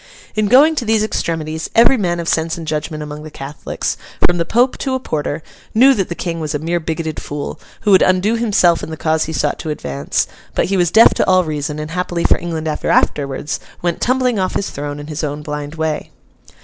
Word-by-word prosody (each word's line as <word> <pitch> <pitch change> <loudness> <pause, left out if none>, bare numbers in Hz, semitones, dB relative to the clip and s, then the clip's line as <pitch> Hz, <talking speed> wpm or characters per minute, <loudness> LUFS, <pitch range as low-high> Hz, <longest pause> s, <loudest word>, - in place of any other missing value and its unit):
In 215 -1 +1
going 280 +8 +6
to - - 0
these 220 -1 +2
extremities, 160 -6 -2
every 235 +3 +6
man 175 -7 0
of 170 - -4
sense 160 0 0
and 165 - -6
judgment 155 0 -3
among 150 0 -7
the 155 - -8
Catholics, 140 0 -4 0.3
from 175 -1 0
the 170 - +1
Pope 245 +7 +2
to 265 -2 -1
a - - -1
porter, 155 - -3 0.3
knew 265 +5 +7
that 195 -7 -1
the 170 - -3
King 170 -1 -3
was 155 -2 -3
a - - +2
mere 165 +3 -1
bigoted 160 -1 -3
fool, 145 0 -5 0.2
who 210 - +2
would 190 - +7
undo 185 +4 +3
himself 200 -7 +3
and - - -6
the 160 - -5
cause 160 0 +1
he 160 - -5
sought 150 -1 0
to 160 - -5
advance; 70 - -1 0.3
but - - +2
he 195 - 0
was 175 -2 +3
deaf 220 +6 +7
to - - 0
all 185 -1 +5
reason, 150 -2 -3
and, 155 +1 -5
happily 175 -1 -2
for - - +3
England 160 -2 -4
ever 155 - -2
afterwards, 140 +1 +1 0.2
went 175 -1 -1
tumbling 250 -3 +2
off 185 -1 -1
his 200 - -1
throne 145 0 -5
in 145 - -7
his 155 +1 -5
own 150 0 -3
blind 150 0 -5
way. 160 -1 -2
165 Hz, 225 wpm, -18 LUFS, 150-190 Hz, 0.3 s, knew